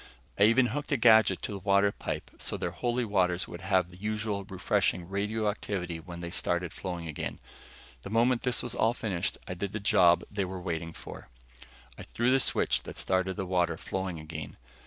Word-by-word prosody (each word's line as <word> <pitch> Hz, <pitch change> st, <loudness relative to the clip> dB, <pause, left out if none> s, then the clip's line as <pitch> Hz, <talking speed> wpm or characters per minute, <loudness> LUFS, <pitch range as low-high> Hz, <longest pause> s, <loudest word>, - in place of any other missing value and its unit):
I 100 Hz, -, +7 dB
even 115 Hz, +4 st, +5 dB
hooked 145 Hz, +1 st, -4 dB
a 145 Hz, -, +3 dB
gadget 110 Hz, -2 st, +5 dB
to -, -, -2 dB
the 100 Hz, -, -4 dB
water 100 Hz, +1 st, +3 dB
pipe -, -, -5 dB
so -, -, -2 dB
their -, -, -2 dB
Holy 120 Hz, 0 st, -1 dB
Waters 90 Hz, -4 st, +1 dB
would 85 Hz, -, -8 dB
have 95 Hz, -2 st, +2 dB
the 90 Hz, -, -14 dB
usual 105 Hz, 0 st, -2 dB
refreshing 90 Hz, -2 st, 0 dB
radioactivity 100 Hz, -3 st, -2 dB
when 85 Hz, +1 st, -9 dB
they 85 Hz, -1 st, -5 dB
started 85 Hz, 0 st, -1 dB
flowing 90 Hz, -3 st, -5 dB
again. 75 Hz, -, -4 dB, 0.6 s
The -, -, -8 dB
moment 120 Hz, +3 st, +3 dB
this 125 Hz, -1 st, +1 dB
was 120 Hz, -, -1 dB
all 115 Hz, +2 st, +2 dB
finished, 100 Hz, -8 st, -2 dB
I -, -, -3 dB
did 100 Hz, +2 st, -4 dB
the 105 Hz, -, -2 dB
job 90 Hz, -4 st, +5 dB
they 100 Hz, -1 st, -1 dB
were 95 Hz, 0 st, -5 dB
waiting 85 Hz, -2 st, -3 dB
for. -, -, -10 dB, 0.7 s
I -, -, -6 dB
threw 120 Hz, +2 st, 0 dB
the 135 Hz, -, +5 dB
switch -, -, +2 dB
that -, -, -9 dB
started 95 Hz, 0 st, 0 dB
the 95 Hz, -, -3 dB
water 90 Hz, -2 st, +1 dB
flowing 95 Hz, -2 st, -4 dB
again. 80 Hz, -1 st, -7 dB
95 Hz, 195 wpm, -29 LUFS, 90-110 Hz, 0.7 s, I